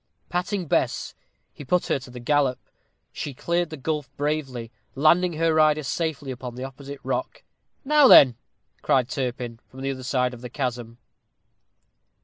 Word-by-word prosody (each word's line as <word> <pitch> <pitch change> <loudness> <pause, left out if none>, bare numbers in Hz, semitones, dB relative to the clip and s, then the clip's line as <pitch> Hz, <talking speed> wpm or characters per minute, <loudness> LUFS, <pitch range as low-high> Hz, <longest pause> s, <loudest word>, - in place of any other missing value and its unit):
Patting 180 +2 -2
Bess, - - 0 0.4
he - - -10
put 175 +6 +1
her - - 0
to 130 -1 -12
a - - -6
gallop. 135 0 +1 0.5
She 140 - -6
cleared 170 +4 -1
the 155 - -7
gulf 150 -1 -3
bravely, 135 -6 -2 0.2
landing 170 +5 +4
her 165 +1 +1
rider 155 -1 +4
safely 145 -2 -3
upon 125 -1 -7
the 125 - -6
opposite 140 +1 -8
rock. - - -3 0.4
"Now 295 -1 +6
then," 130 - +9 0.5
cried 130 -2 +2
Turpin, 125 -3 -4
from 130 - -12
the 135 0 -1
other 130 -1 -6
side 125 0 0
of 120 - -10
the 125 - -7
chasm. 120 -3 -4
140 Hz, 155 wpm, -24 LUFS, 125-155 Hz, 0.5 s, then